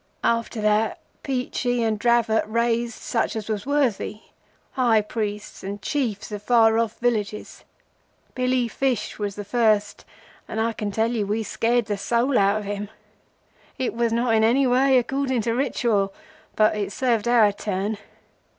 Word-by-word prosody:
After 230 Hz, -1 st, 0 dB
that, 215 Hz, +1 st, +2 dB, 0.2 s
Peachey 250 Hz, -2 st, -1 dB
and 220 Hz, -2 st, 0 dB
Dravot 235 Hz, -1 st, +3 dB
raised 235 Hz, +1 st, 0 dB
such 230 Hz, -, -2 dB
as 215 Hz, -2 st, -4 dB
was 215 Hz, +2 st, -3 dB
worthy—high 240 Hz, -2 st, -1 dB
priests 210 Hz, -1 st, -5 dB
and 200 Hz, +2 st, -5 dB
Chiefs 225 Hz, -5 st, -2 dB
of 205 Hz, -1 st, -5 dB
far 225 Hz, 0 st, +4 dB
off 230 Hz, -1 st, -1 dB
villages. 215 Hz, -4 st, -2 dB, 0.7 s
Billy 255 Hz, -1 st, +1 dB
Fish 245 Hz, -3 st, -2 dB
was 205 Hz, -1 st, -3 dB
the 205 Hz, -, -6 dB
first, 215 Hz, -2 st, +1 dB, 0.4 s
and 220 Hz, -, -4 dB
I 225 Hz, +1 st, 0 dB
can 210 Hz, -1 st, -3 dB
tell 220 Hz, +3 st, 0 dB
you 215 Hz, -4 st, -1 dB
we 215 Hz, +2 st, -1 dB
scared 235 Hz, +2 st, 0 dB
the 205 Hz, -1 st, -2 dB
soul 240 Hz, +6 st, +1 dB
out 200 Hz, +1 st, +3 dB
of 215 Hz, -, -4 dB
him. 205 Hz, 0 st, -4 dB, 0.9 s
It 260 Hz, -, -1 dB
was 235 Hz, 0 st, 0 dB
not 235 Hz, 0 st, +1 dB
in 220 Hz, 0 st, +3 dB
any 250 Hz, +5 st, +4 dB
way 260 Hz, +1 st, +4 dB
according 260 Hz, 0 st, 0 dB
to 230 Hz, +1 st, -1 dB
Ritual, 230 Hz, -6 st, 0 dB, 0.4 s
but 215 Hz, 0 st, +3 dB
it 205 Hz, -1 st, -3 dB
served 235 Hz, -1 st, 0 dB
our 230 Hz, -4 st, +5 dB
turn. 205 Hz, +1 st, -3 dB
225 Hz, 155 wpm, -23 LUFS, 210-245 Hz, 0.9 s, our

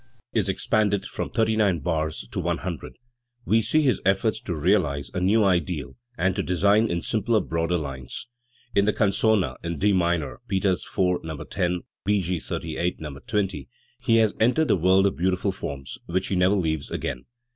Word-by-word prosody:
I -, -, -36 dB
r -, -, -35 dB
^ 120 Hz, -, -38 dB, 0.2 s
V -, -, +2 dB
^, -, -, +4 dB
is 100 Hz, -, -3 dB
expanded 100 Hz, +1 st, +1 dB
from -, -, -4 dB
thirty 110 Hz, -1 st, +1 dB
nine 100 Hz, -5 st, +3 dB
bars 80 Hz, -1 st, -2 dB
to -, -, -3 dB
one -, -, 0 dB
hundred, -, -, -6 dB, 0.5 s
we 115 Hz, +1 st, +3 dB
see 155 Hz, +7 st, +2 dB
his 130 Hz, -7 st, +2 dB
effort 95 Hz, +4 st, +2 dB
to 90 Hz, -, -2 dB
realise 75 Hz, -4 st, +1 dB
a 90 Hz, -, -2 dB
new 105 Hz, +4 st, +4 dB
ideal, 85 Hz, -6 st, 0 dB, 0.2 s
and 95 Hz, 0 st, +1 dB
to 100 Hz, -, 0 dB
design 100 Hz, +5 st, +3 dB
in 85 Hz, -1 st, -2 dB
simpler, 110 Hz, 0 st, +1 dB
broader 85 Hz, -1 st, -1 dB
lines. 65 Hz, -5 st, -5 dB, 0.5 s
In 100 Hz, -, +3 dB
the 105 Hz, -, +2 dB
canzona 105 Hz, -1 st, +2 dB
in 85 Hz, -1 st, -3 dB
D 100 Hz, +6 st, +3 dB
minor 85 Hz, -4 st, 0 dB
(Peters 95 Hz, -1 st, 0 dB
IV, 90 Hz, -1 st, 0 dB
No. 80 Hz, -2 st, -5 dB
10; 90 Hz, +2 st, -1 dB, 0.3 s
E.G. 95 Hz, -4 st, +1 dB
XXXVIII, 85 Hz, +3 st, -3 dB
No. 75 Hz, -3 st, -7 dB
20), 95 Hz, -, -2 dB, 0.3 s
he 115 Hz, -, +3 dB
has 110 Hz, -2 st, +4 dB
entered 125 Hz, +8 st, +3 dB
the -, -, +5 dB
world 95 Hz, +2 st, +4 dB
of 100 Hz, -, +1 dB
beautiful 95 Hz, +2 st, 0 dB
forms, 70 Hz, -8 st, -6 dB
which 95 Hz, +2 st, -1 dB
he 95 Hz, -, 0 dB
never 95 Hz, +2 st, +3 dB
leaves 80 Hz, -6 st, -1 dB
again. 60 Hz, 0 st, -4 dB
95 Hz, 195 wpm, -25 LUFS, 85-105 Hz, 0.5 s, the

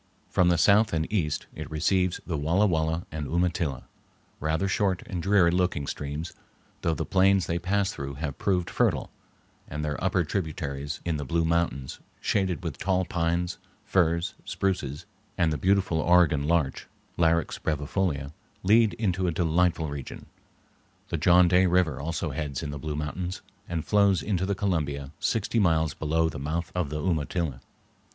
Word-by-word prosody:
From 90 Hz, -1 st, +4 dB
the 85 Hz, -, +3 dB
south 105 Hz, +5 st, +4 dB
and 80 Hz, -1 st, +1 dB
east 75 Hz, -8 st, 0 dB
it 80 Hz, -1 st, -7 dB
receives 90 Hz, +3 st, +1 dB
the 85 Hz, -, -2 dB
Walla 85 Hz, +8 st, +2 dB
Walla 80 Hz, -2 st, 0 dB
and 75 Hz, -2 st, -4 dB
Umatilla, 85 Hz, -4 st, 0 dB, 0.6 s
rather 80 Hz, +5 st, 0 dB
short 95 Hz, -2 st, 0 dB
and 90 Hz, -2 st, -4 dB
dreary 95 Hz, -2 st, +4 dB
looking 90 Hz, -5 st, 0 dB
streams, 75 Hz, +4 st, -5 dB, 0.5 s
though 80 Hz, -1 st, +1 dB
the -, -, -3 dB
plains 95 Hz, 0 st, +3 dB
they 85 Hz, +1 st, -1 dB
pass 100 Hz, +3 st, 0 dB
through 70 Hz, -6 st, -6 dB
have 70 Hz, -1 st, -5 dB
proved 90 Hz, -3 st, 0 dB
fertile, -, -, +1 dB, 0.6 s
and 75 Hz, +1 st, -4 dB
their 75 Hz, +1 st, -3 dB
upper 95 Hz, -1 st, +2 dB
tributaries 75 Hz, -4 st, -3 dB
in 85 Hz, -3 st, 0 dB
the 75 Hz, -, -4 dB
Blue 85 Hz, +4 st, 0 dB
Mountains, 80 Hz, -6 st, -1 dB, 0.2 s
shaded 95 Hz, -2 st, 0 dB
with 80 Hz, -6 st, -5 dB
tall 95 Hz, -1 st, +1 dB
pines, 85 Hz, +1 st, -1 dB, 0.3 s
firs, 85 Hz, -4 st, +1 dB
spruces, 75 Hz, -8 st, -2 dB, 0.3 s
and 85 Hz, -3 st, +2 dB
the -, -, -1 dB
beautiful 95 Hz, -1 st, +2 dB
Oregon 80 Hz, -4 st, +4 dB
larch 80 Hz, -5 st, 0 dB, 0.3 s
(Larix 85 Hz, -1 st, +1 dB
brevifolia), 75 Hz, -1 st, -1 dB, 0.3 s
lead 110 Hz, +2 st, +4 dB
into 95 Hz, -4 st, 0 dB
a -, -, +2 dB
delightful 85 Hz, 0 st, +1 dB
region. 70 Hz, -2 st, -7 dB, 0.8 s
The 85 Hz, -, -1 dB
John 90 Hz, +3 st, +5 dB
Day 90 Hz, +1 st, +4 dB
River 85 Hz, -6 st, +2 dB
also 80 Hz, +1 st, -3 dB
heads 70 Hz, -1 st, -4 dB
in 75 Hz, -, -4 dB
the 75 Hz, -, -6 dB
Blue 75 Hz, +1 st, -4 dB
Mountains, 90 Hz, +5 st, -4 dB, 0.3 s
and 85 Hz, -2 st, -2 dB
flows 100 Hz, +1 st, +3 dB
into 95 Hz, -3 st, 0 dB
the 100 Hz, -, 0 dB
Columbia 75 Hz, -9 st, -1 dB
sixty 115 Hz, 0 st, 0 dB
miles 80 Hz, -6 st, +2 dB
below 80 Hz, +1 st, +1 dB
the 80 Hz, -, -5 dB
mouth 80 Hz, +4 st, -3 dB
of 90 Hz, -5 st, -1 dB
the 75 Hz, +1 st, -3 dB
Umatilla. 80 Hz, -5 st, -1 dB
85 Hz, 160 wpm, -27 LUFS, 75-90 Hz, 0.8 s, John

